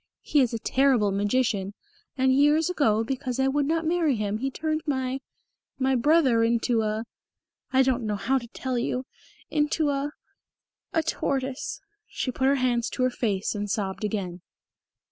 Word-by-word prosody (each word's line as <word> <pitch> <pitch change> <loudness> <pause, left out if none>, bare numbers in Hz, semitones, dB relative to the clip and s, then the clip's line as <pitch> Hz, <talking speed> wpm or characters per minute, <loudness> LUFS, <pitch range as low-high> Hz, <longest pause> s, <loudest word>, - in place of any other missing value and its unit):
He 295 - +2
is 255 -4 +3
a 230 - -2
terrible 250 -3 +2
magician, 205 -1 0 0.4
and 260 0 +3
years 295 +5 +4
ago 225 -10 +2
because 255 +1 -3
I 265 - +3
would 280 +1 +1
not 325 +1 0
marry 325 -4 +2
him 210 0 -2
he 270 +3 -1
turned 310 +3 -2
my 260 -2 -1 0.6
my 265 0 +1
brother 260 -3 +4
into 230 0 +2
a 215 +1 -2 0.7
I 265 0 +5
don't 255 -3 0
know 210 - 0
how 265 +6 +1
to 235 - -10
tell 255 +1 -3
you 250 +2 -2 0.5
into 295 0 +1
a 280 +1 -1 0.8
a 325 - +1
tortoise." 270 -3 -2 0.3
She 255 - -3
put 265 +2 0
her 275 - +4
hands 245 -3 +1
to 255 - -2
her 255 - +2
face 205 -5 -1
and 205 -1 -3
sobbed 195 0 -2
again. 190 -5 -3
255 Hz, 165 wpm, -26 LUFS, 225-275 Hz, 0.8 s, I